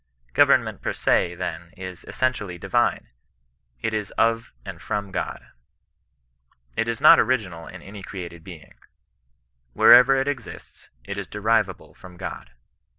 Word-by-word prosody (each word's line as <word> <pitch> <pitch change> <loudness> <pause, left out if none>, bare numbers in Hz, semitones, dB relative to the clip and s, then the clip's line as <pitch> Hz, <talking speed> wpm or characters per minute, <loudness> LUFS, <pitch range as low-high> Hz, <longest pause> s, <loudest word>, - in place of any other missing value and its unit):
Government - - +3
per - - -2
se, 90 0 +1
then, 85 -1 -6
is 95 -1 -8
essentially 105 -8 -2
divine; - - 0 0.7
it 110 - -1
is 105 -2 -2
of 115 0 +1
and - - -8
from 100 -1 -4
God. 95 - -5 1.3
It 115 - -1
is 115 0 -2
not 160 +2 +8
original 95 -10 -1
in - - -11
any 100 +1 -10
created 85 -4 -8
being. 85 -6 -12 1.0
Wherever 125 +2 +7
it 135 +1 0
exists, 130 -6 -7 0.2
it - - -6
is - - -5
derivable 110 +2 -1
from 90 -1 -14
God. 90 -2 -7
100 Hz, 135 wpm, -24 LUFS, 90-115 Hz, 1.3 s, not